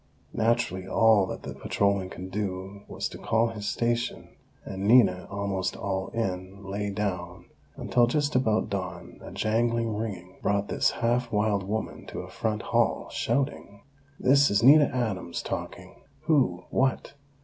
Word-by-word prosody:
Naturally, 110 -5 0
all 110 -3 +4
that - - -6
that - - -8
patrolman 100 -2 0
could 95 0 -8
do 95 -1 -4
was - - -3
to - - -10
call 115 +1 +1
his 105 -2 -6
station; 120 0 -1 0.4
and 95 +1 -4
Nina, 100 -7 +5
almost 100 -2 -2
all 95 -1 -2
in, 95 -3 -4
lay 100 +1 -3
down, 90 -3 -3 0.3
until, 120 -1 +2
just 145 +3 0
about 110 -4 +2
dawn 95 -3 -5
a - - -8
jangling 115 0 0
ringing 95 -5 -5
brought 100 0 0
this - - +2
half 120 +1 0
wild 105 -1 +1
woman 105 +3 -4
to - - -5
a - - -10
front 110 -1 -2
hall, - - +1
shouting: 120 -5 -2 0.4
"This 140 +2 +5
is 100 +1 +2
Nina 145 +4 +8
Adams 110 -10 -3
talking! - - -6 0.2
Who? 125 - +2
_What? 130 0 +1
105 Hz, 150 wpm, -27 LUFS, 95-115 Hz, 0.4 s, Nina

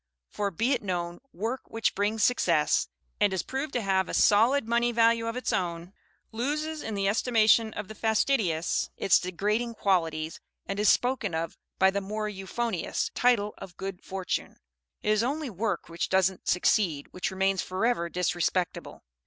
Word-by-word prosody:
For, 205 -1 -1
be 225 +8 0
it 250 - -1
known, 175 -3 -3
work 230 +8 -3
which 225 -1 0
brings 210 +2 0
success, 165 -11 +2 0.3
and 205 -1 +3
is 190 - -1
proved 270 +2 -4
to 245 - -1
have 190 -1 +1
a - - -2
solid 225 +5 +4
money 235 +1 +2
value 230 0 +3
of 230 - -3
its 250 - -2
own, 175 0 -2 0.4
loses 300 +6 -2
in 220 - -4
the 195 0 0
estimation 220 0 +3
of 210 - -5
the 220 - -8
fastidious 215 -6 +1
its 195 - +4
degrading 210 +6 -1
qualities, 165 -6 0 0.3
and 195 +1 -4
is 210 - +4
spoken 245 -8 +1
of 165 0 -3 0.2
by 190 0 +5
the 200 +1 -1
more 215 +2 -3
euphonious 205 0 -2
title 220 -4 +2
of 175 -2 -10
"good 195 -1 -6
fortune." 190 -3 -4 0.5
It - - 0
is 215 0 +3
only 275 +2 -2
work 200 -1 -2
which 170 +1 -3
doesn't 190 0 +1
succeed, 175 -4 +2
which 180 - -2
remains 190 0 +1
forever 185 -2 0
disrespectable. 180 0 -1
205 Hz, 165 wpm, -28 LUFS, 185-230 Hz, 0.5 s, by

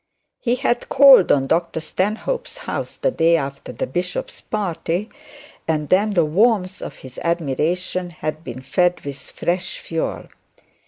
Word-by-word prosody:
He 240 -1 +1
had 245 -2 -1
called 275 -8 +8
at 135 -1 +3
Dr 165 +2 0
Stanhope's 220 - -2
house - - -4
the - - +1
day 165 +1 +4
after 140 -2 -5
the - - -3
bishop's - - -4
party, 195 -1 -2 0.6
and 150 -2 -1
then 200 +3 +3
the 170 -3 +4
warmth 195 +3 +2
of - - -6
his 130 -1 -11
admiration 170 +3 -1
had 155 -1 -5
been 130 -3 -7
fed 180 +6 +1
with 140 -1 -5
fresh 180 +1 -3
fuel. 165 -1 -3
175 Hz, 145 wpm, -21 LUFS, 155-210 Hz, 0.6 s, called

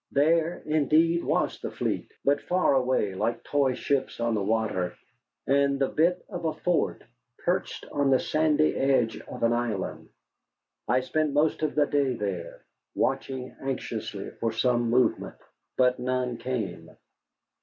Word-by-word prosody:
There, 165 +4 +2
indeed, 155 +3 +3
was - - 0
the - - -4
fleet, - - -3
but 145 +1 +3
far 180 -3 +2
away, 130 -6 +1
like 115 +5 -2
toy 140 -3 +1
ships 135 -2 -1
on 115 0 +1
the 105 - 0
water, 105 -3 0 0.5
and 140 0 +3
the 135 -1 +1
bit 175 +3 +1
of 180 -4 -6
a 160 - +1
fort 175 +1 0 0.4
perched - - -1
on 145 -1 +1
the 130 -1 +5
sandy 155 0 +2
edge 130 -4 +2
of - - -8
an 115 0 +4
island. 120 -5 -3 0.8
I 125 +3 +3
spent 150 +3 0
most 150 +2 +2
of 155 -2 -1
that 145 -1 +2
day 140 -3 +2
there, 95 -6 -5 0.3
watching 135 -1 -2
anxiously 115 -6 -4
for 115 - 0
some 120 +1 +1
movement. 125 +2 +1 0.4
But 125 0 +3
none 125 -1 -1
came. 110 -10 -4
130 Hz, 145 wpm, -27 LUFS, 115-150 Hz, 0.8 s, the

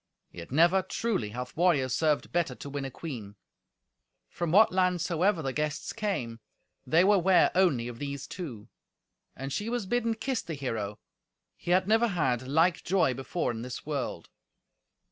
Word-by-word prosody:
Yet 85 -1 -9
never, 170 +7 +4
truly, 190 - -2
hath 125 +3 -6
warrior 165 -6 +3
served 150 +4 0
better 165 -7 0
to 140 - -8
win 140 -1 -3
a - - -4
queen." 120 -9 -7 0.9
From 170 -2 -3
what 215 +5 +6
land 180 -1 +2
soever 175 +1 +1
the 135 -1 -2
guests 150 +1 -2
came, 190 - -3 0.5
they 165 +3 +5
were 200 +1 +5
ware 185 +1 +4
only 160 -11 +2
of 120 -1 -8
these 140 -1 -4
two. 130 - -7 0.7
And 135 +1 -5
she 210 +8 -2
was 240 -3 -2
bidden 230 +2 0
kiss 255 +2 -2
the 165 - -6
hero. 110 -7 -3 0.6
He - - -9
had 185 +1 +3
never 225 +2 +4
had 130 - 0
like 165 +5 +2
joy 175 -7 +2
before 135 +2 -2
in 115 -1 -6
this 125 +1 -7
world. 145 -4 -3
160 Hz, 165 wpm, -29 LUFS, 130-185 Hz, 0.9 s, what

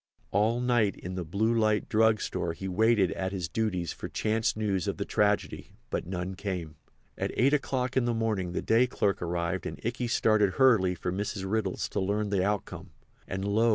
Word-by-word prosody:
All 110 +4 +2
night 120 -5 +2
in 90 - -7
the 90 -1 -3
Blue 100 +8 0
Light 110 -2 +2
Drug 110 0 +3
Store 85 - -2
he 95 +3 -6
waited 105 -1 +3
at 95 0 -3
his 90 -4 -3
duties 90 -2 -1
for - - -7
chance 110 +1 0
news 100 -5 -1
of - - -2
the - - -2
tragedy, - - 0 0.2
but - - -2
none 90 0 -3
came. 90 -5 -4 0.4
At - - -1
eight 135 +4 +3
o'clock 130 -3 0
in 130 -2 +2
the 120 - +1
morning 105 -6 -1
the - - -2
day 115 +3 +4
clerk 100 -5 0
arrived 85 +1 -2
and - - -7
Ikey 120 +1 -1
started 110 -4 +3
hurriedly 110 -9 +4
for 90 +1 -3
Mrs. 100 +1 -3
Riddle's 100 -2 -1
to - - -2
learn 100 +2 -1
the 95 -2 +2
outcome. 105 0 -3 0.4
And, 95 +1 -3
lo! 110 +3 +3
105 Hz, 195 wpm, -29 LUFS, 95-115 Hz, 0.4 s, day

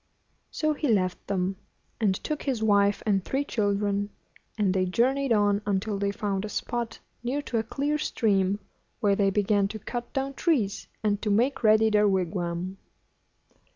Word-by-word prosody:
So 310 -1 0
he 295 0 -2
left 185 -6 0
them, 190 -1 -1 0.4
and 205 -4 +2
took 300 +9 -4
his 250 -6 -1
wife 200 -1 +3
and 195 -3 +2
three 275 +7 -1
children, 205 -3 0 0.5
and 200 -4 +2
they 185 -1 +1
journeyed 260 +7 +1
on 205 -2 +3
until 200 +1 0
they 200 0 +1
found 200 -1 -2
a 215 - -4
spot 240 +1 -3 0.2
near 265 +5 -2
to 235 -5 -1
a - - -1
clear 290 +6 -1
stream, 200 -8 +1 0.4
where 205 -3 +3
they 195 -1 +3
began 200 0 +2
to 220 - -6
cut 240 +3 -5
down 270 0 -2
trees, 250 - 0 0.2
and 205 -1 +1
to 215 - -1
make 240 +6 +2
ready 220 0 +5
their 210 0 +4
wigwam. 180 -1 -1
210 Hz, 165 wpm, -27 LUFS, 195-240 Hz, 0.5 s, ready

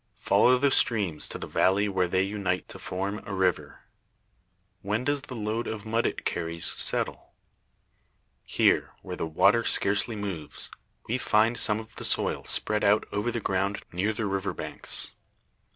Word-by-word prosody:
Follow 125 +1 +4
the 140 +2 +2
streams 100 -13 +2
to - - -6
the - - -6
valley 100 +3 +2
where 95 -2 +1
they 95 +2 +1
unite 95 -2 -2
to - - -10
form 100 +3 -4
a 100 - -5
river. 95 -2 -1 1.0
When 105 +4 -1
does 145 +1 0
the 130 - -9
load 110 +1 -2
of 105 -1 -5
mud 115 +1 +1
it - - -5
carries 85 -1 -2
settle? - - 0 1.1
Here, - - +2
where - - -5
the 80 - -3
water 100 +8 +4
scarcely 105 +3 +3
moves, 95 -7 -4 0.4
we 125 +3 -1
find 110 0 +3
some 105 -2 +4
of 110 0 -12
the - - -7
soil - - 0
spread 105 0 0
out 105 +1 +4
over 105 +4 -1
the 120 - -2
ground 100 0 -1
near 95 +5 0
the 110 0 -3
river 95 -2 -2
banks. - - -4
105 Hz, 165 wpm, -27 LUFS, 95-110 Hz, 1.1 s, Follow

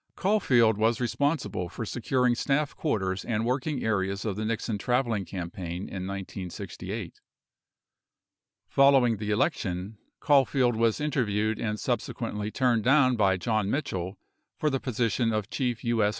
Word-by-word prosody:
Caul 205 +3 +2
field 115 - +3
was 115 +2 +2
responsible 125 - -1
for 115 - -5
securing 125 +2 +1
staff 140 +4 0
quarters 95 - -1
and 115 -1 -1
working 130 +3 -1
areas 100 -2 -1
of 105 -3 -1
the 105 - -3
Nixon 110 -1 -2
traveling 120 -4 0
campaign 90 -1 -5
in 95 -1 -5
1968. 95 -2 -6 1.5
Following 135 -5 +4
the 105 +1 -4
election, 100 -1 -1 0.2
Caulfield 135 -4 +3
was 115 -1 +2
interviewed 110 -7 0
and 105 -2 -2
subsequently 110 -3 -2
turned 120 -2 +1
down 130 -1 +4
by 95 -4 +3
John 110 0 0
Mitchell 95 - -2 0.4
for 150 - +1
the 135 - 0
position 120 -1 0
of 110 0 -2
Chief 125 -4 -1
TI.S. 115 -3 +2
115 Hz, 135 wpm, -27 LUFS, 100-130 Hz, 1.5 s, Following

